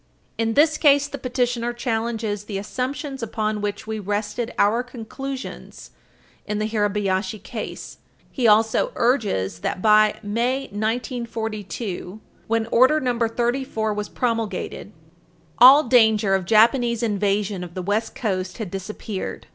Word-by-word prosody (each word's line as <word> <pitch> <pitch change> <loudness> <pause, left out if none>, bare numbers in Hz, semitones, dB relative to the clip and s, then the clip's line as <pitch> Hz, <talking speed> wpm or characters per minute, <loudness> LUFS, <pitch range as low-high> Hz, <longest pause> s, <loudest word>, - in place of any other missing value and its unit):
In 225 -1 -1
this 310 +1 +4
case, 285 -2 +5
the 280 -1 -7
petitioner 245 -1 -1
challenges 225 -3 -2
the 205 -2 -4
assumptions 260 +6 -4
upon 215 -2 -2
which 205 0 -3
we 220 0 -4
rested 210 +4 -3
our 215 +4 +3
conclusions 255 +2 -8 0.6
in 210 0 -2
the 215 - -1
Hirabayashi 205 -2 0
case. - - -7 0.3
He 250 -4 +1
also 220 - +3
urges 210 - 0
that, - - -3
by 215 +1 +5
May, 235 +6 0
1942, 220 -3 -4 0.3
when 225 0 +1
Order 260 +6 +5
No. 245 -4 -1
34 235 -1 -1
was 210 0 -4
promulgated, 230 -4 -3 0.7
all 265 +5 +9
danger 220 -5 +4
of 190 -2 +1
Japanese 235 +3 +3
invasion 205 -2 0
of 175 -1 -10
the 185 - -4
West 210 +4 -1
Coast 185 -5 -2
had 215 -6 -5
disappeared. 195 +1 -6
220 Hz, 130 wpm, -23 LUFS, 205-245 Hz, 0.7 s, all